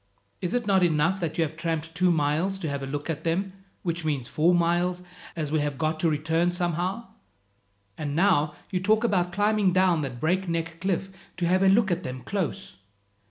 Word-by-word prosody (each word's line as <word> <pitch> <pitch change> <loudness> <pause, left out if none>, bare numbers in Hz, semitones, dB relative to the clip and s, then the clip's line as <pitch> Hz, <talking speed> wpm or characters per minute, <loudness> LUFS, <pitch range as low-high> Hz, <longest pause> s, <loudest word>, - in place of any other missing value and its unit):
Is 180 +5 -1
it 245 -2 0
not 195 -2 +3
enough 170 +2 +2
that 165 -3 -3
you 165 - +3
have 160 0 -4
tramped 165 -1 -3
two 180 +2 +2
miles 160 +5 +1
to 180 -4 -4
have 140 -1 -3
a 135 - -4
look 145 +1 -4
at 160 -1 -3
them, 185 +4 -1 0.3
which 170 -2 -2
means 145 -6 -1
four 165 +5 +3
miles, 175 +1 +1 0.3
as 155 -3 -3
we 155 - +2
have 145 -2 -2
got 155 +2 -1
to 165 - +2
return 160 +3 +1
somehow? 175 +5 -1 0.9
And 145 -2 -3
now 160 -5 +3 0.2
you 185 - 0
talk 215 +4 +2
about 180 -6 +1
climbing 205 0 +2
down 185 -3 +3
that 130 -4 -5
break 180 +6 0
neck 165 0 -3
cliff 190 0 -1 0.3
to 175 - 0
have 185 +2 +3
a 195 - +5
look 205 0 +4
at 175 +1 0
them 130 -6 -6
close!" 190 - -3
170 Hz, 205 wpm, -26 LUFS, 155-185 Hz, 0.9 s, a